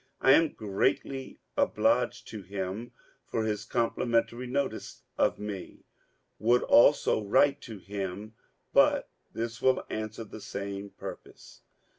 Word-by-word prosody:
I 135 - +5
am 160 +2 +5
greatly 115 +6 -1 0.2
obliged - - +1
to 110 -2 -7
him 95 +4 -5 0.4
for 110 - -1
his 105 -1 -2
complimentary 120 +1 0
notice 140 +2 -3
of - - +2
me; 105 -3 -7 0.5
would 120 +3 +3
also 120 -3 +5
write 130 +7 +3
to 110 - -7
him, 100 +2 -5 0.4
but - - +4 0.2
this 115 0 -4
will 130 0 +3
answer 110 +1 -4
the 110 0 -10
same 100 0 -5
purpose. - - -11
110 Hz, 120 wpm, -29 LUFS, 100-120 Hz, 0.5 s, I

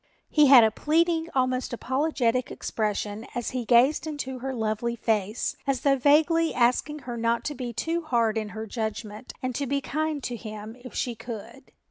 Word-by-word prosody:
He 300 -2 +6
had 260 -3 +9
a 220 - +4
pleading, 325 +5 +1
almost 255 -1 0
apologetic 255 -1 0
expression 210 0 -3
as 240 -2 -2
he 250 -2 -3
gazed 255 +7 +4
into 265 -4 -4
her 265 +2 -3
lovely 225 0 -1
face 220 -1 -1
as 270 -3 0
though 275 -1 +4
vaguely 315 +5 +3
asking 250 +5 +1
her 240 -1 -4
not 230 0 0
to 295 - -3
be 250 -3 -5
too 325 +9 -2
hard 235 -8 +1
in 215 -1 -2
her 220 +1 -6
judgment 220 +1 -5
and 255 0 -1
to 280 +3 -2
be 280 +2 0
kind 305 +1 -2
to 245 - -3
him 215 0 -8
if 255 - -10
she 245 - -1
could. 235 +4 -9
250 Hz, 180 wpm, -26 LUFS, 225-285 Hz, -, had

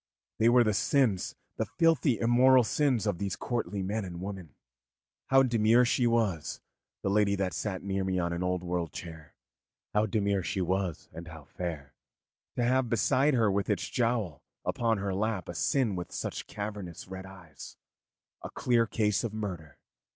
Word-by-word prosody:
They 115 - +5
were 120 0 +6
the 110 -2 +1
sins, 110 -3 +1 0.2
the - - -1
filthy, 160 -8 +2
immortal 125 +3 +5
sins 130 -2 +1
of 100 -5 -1
those 100 -2 -2
courtly 110 -5 -3
men 105 +3 -2
and 90 -2 -7
women. 95 -6 -7 0.7
How 135 0 +5
demure 120 0 +4
she 120 0 +2
was, 110 -9 0 0.4
the - - 0
lady 100 -1 +3
that 95 -2 -1
sat 95 -4 -3
near 95 -1 -1
me 95 -1 -1
on 85 -1 0
an 85 - -3
old 90 -1 -1
world 85 -2 -2
chair 80 -3 -9 0.6
how 105 +1 +2
demure 100 -1 +1
she 90 +3 -3
was, 95 -1 -1
and 85 +1 -8
how 80 -1 -10
fair, 80 -1 -6 0.6
to 120 - 0
have 130 0 +2
beside 130 +6 +3
her 110 -4 +3
with 100 +2 -1
its 105 - 0
jowl 115 - -1 0.2
upon 115 -2 +1
her 100 -1 -2
lap 105 -1 -1
a - - -5
sin 115 +2 +1
with 90 -1 -5
such - - -4
cavernous 100 -5 -6
red 95 0 -8
eyes, 85 -7 -12 0.6
a - - -6
clear 120 -2 +1
case 105 0 +1
of 110 -2 -3
murder. 90 -9 -5
100 Hz, 175 wpm, -29 LUFS, 90-115 Hz, 0.7 s, were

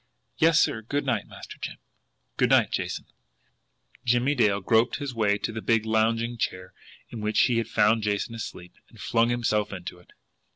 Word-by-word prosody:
"Yes, 165 0 +5
sir. 110 - +1
Good 140 +6 -2
night, 120 -6 -1
Master - - -11
Jim." - - -6 0.6
"Good - - +2
night, - - +4
Jason." - - -3 1.0
Jimmie 125 +3 +2
Dale 105 -7 +2
groped 115 +5 +2
his 140 -3 -5
way 105 -3 +1
to 110 - -3
the 110 0 -5
big 115 -1 +1
lounging 115 +2 +1
chair 90 -3 -3 0.4
in 115 - -6
which 105 0 +2
he 120 -2 +3
had 115 - -2
found 110 +2 +3
Jason 105 +2 -1
asleep, 110 -6 -8 0.2
and - - -18
flung 115 0 +1
himself 110 -3 0
into 90 -2 -7
it. 90 - -22
115 Hz, 175 wpm, -26 LUFS, 105-120 Hz, 1.0 s, Yes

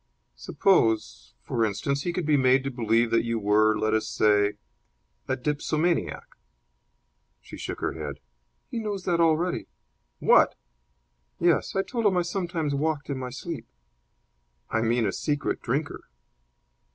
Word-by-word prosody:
"Suppose, 110 - +1
for 115 - -1
instance, 110 +7 -1
he 175 - -2
could 170 -1 -3
be 150 -1 +3
made 130 -1 +4
to 135 - -3
believe 115 -1 +1
that 115 - +3
you 115 0 -1
were, 105 0 +3
let 110 0 0
us 110 0 +1
say, 105 -1 +3 0.7
a 130 - 0
dipsomaniac." 155 +5 -1 1.2
She - - -12
shook - - -6
her - - -1
head. 75 -3 -6 0.5
"He 235 - -2
knows 205 -4 -4
that 170 -2 +1
already." 165 +2 +1 0.5
"What!" - - +4 0.8
"Yes; 170 -4 +2
I 195 - +2
told 230 -1 0
him 190 -3 +2
I 175 - +2
sometimes 170 -4 -2
walked 145 0 -1
in 135 - -3
my 130 -1 -4
sleep." 135 -2 -7 1.0
"I 110 - +1
mean 115 0 +1
a - - -1
secret 145 -1 -2
drinker." 140 +5 -3
135 Hz, 145 wpm, -26 LUFS, 110-170 Hz, 1.2 s, made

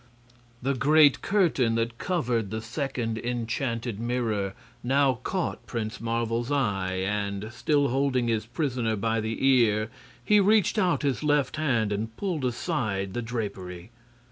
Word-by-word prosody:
The 135 +2 +1
great 145 +2 +5
curtain 160 - +2
that 115 0 -2
covered 120 - 0
the 110 +2 -3
second 115 -1 -3
enchanted 115 -1 -2
mirror 115 -5 -1 0.3
now 135 -1 +2
caught 185 +5 -3
Prince 115 -1 -4
Marvel's 115 +2 -1
eye, 100 -10 0
and, 100 +2 -2
still 145 +3 +1
holding 130 -1 +1
his 110 -1 0
prisoner 120 -4 -1
by 115 +2 0
the 110 +4 -2
ear, 110 -4 +3 0.3
he 210 +7 +5
reached 210 +1 +3
out 180 -5 +2
his 140 -3 0
left 145 -2 +1
hand 120 -9 +1
and 110 +2 -3
pulled 175 -9 -2
aside 115 - -2
the 120 - -2
drapery. 100 -5 -5
120 Hz, 140 wpm, -27 LUFS, 110-140 Hz, 0.3 s, great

